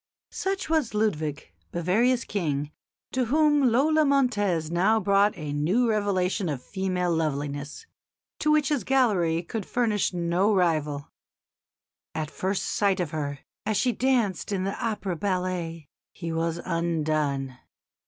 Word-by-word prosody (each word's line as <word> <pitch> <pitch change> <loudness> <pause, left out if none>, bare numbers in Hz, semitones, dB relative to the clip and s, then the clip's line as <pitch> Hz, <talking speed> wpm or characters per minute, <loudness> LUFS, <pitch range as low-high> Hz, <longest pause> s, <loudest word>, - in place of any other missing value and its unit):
Such 385 0 -2
was 310 -9 0
Ludwig, 155 -9 -1 0.2
Bavaria's 230 +9 +2
King, 150 -7 -2 0.4
to 255 -1 0
whom 295 0 +4
Lola 310 +6 +4
Montez 205 - +1
now 195 +6 +3
brought 200 0 +3
a 150 -3 -4
new 180 +12 +2
revelation 200 -3 0
of 135 -4 -4
female 185 -2 -1
loveliness, 145 - -3 0.5
to 305 - +1
which 300 -2 +3
his 285 -8 0
gallery 185 -10 +2
could 215 +5 -4
furnish 220 -1 0
no 180 +4 +1
rival. 155 -5 0 1.0
At 155 -1 -3
first 190 +1 -2
sight 200 -2 +1
of 170 -4 -2
her, 145 -3 -4 0.2
as 215 -1 0
she 250 +4 +2
danced 235 -5 0
in 190 -2 0
the 195 +1 -3
opera 210 -5 -2
ballet, 180 -4 -2 0.3
he 165 -2 -5
was 165 0 -1
undone. 155 -6 -1
185 Hz, 135 wpm, -26 LUFS, 160-225 Hz, 1.0 s, whom